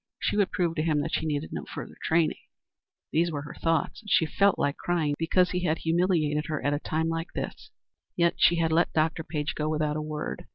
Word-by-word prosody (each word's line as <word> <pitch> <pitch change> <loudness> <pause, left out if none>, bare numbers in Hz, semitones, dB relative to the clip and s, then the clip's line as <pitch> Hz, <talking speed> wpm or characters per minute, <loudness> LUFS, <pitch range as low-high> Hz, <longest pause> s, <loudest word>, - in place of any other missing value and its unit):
She - - 0
would 205 -2 +2
prove 175 -2 0
to - - +2
him 155 -2 +1
that - - -4
she 160 - 0
needed 150 0 -2
no - - -4
further - - -8
training. 160 -1 +2 0.7
These 170 +2 +2
were 145 -2 -3
her 145 - -8
thoughts, 165 +3 -1
and 210 - -11
she 165 - +4
felt 200 +5 +3
like 140 - 0
crying, 165 -4 0
because 180 +3 +2
he 180 -1 -1
had 160 -1 +1
humiliated 160 -3 +1
her 155 -2 -2
at 145 - +2
a 145 - 0
time 160 +1 -1
like 165 +1 -3
this. - - -5 0.5
Yet 170 -1 +3
she 170 - +5
had 165 -1 +1
let 165 +2 +2
Dr. 160 +1 +1
Page 150 -3 -3
go 150 +3 -2
without 150 -1 0
a - - -2
word. 150 - -5
160 Hz, 230 wpm, -27 LUFS, 150-170 Hz, 0.7 s, she